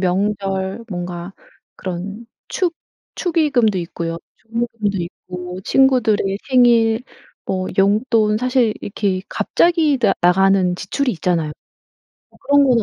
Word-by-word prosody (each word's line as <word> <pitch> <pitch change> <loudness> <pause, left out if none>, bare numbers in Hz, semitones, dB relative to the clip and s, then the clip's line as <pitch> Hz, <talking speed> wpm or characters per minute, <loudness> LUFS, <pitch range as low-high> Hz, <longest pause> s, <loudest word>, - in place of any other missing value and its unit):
명절 195 +2 -1
뭔가 175 -1 -5 0.4
그런 195 +5 -6 0.2
축 350 -3 -1 0.4
축의금도 290 - +1
있고요. 165 -1 -4 0.2
축의금도 225 -3 -3
있고 180 +1 -7
친구들의 220 -7 +3
생일 235 -2 +4 0.4
뭐 185 -1 -2
용돈 210 +2 +3
사실 250 -2 +2
이렇게 195 -2 -2
갑자기 325 -5 +2
나 230 - +3
나가는 185 0 +3
지출이 250 +9 -1
있잖아요. 165 -3 -1 0.8
어 - - -23
그런 285 0 +4
거는 240 -4 +3
205 Hz, 250 characters per minute, -19 LUFS, 185-245 Hz, 0.8 s, 생일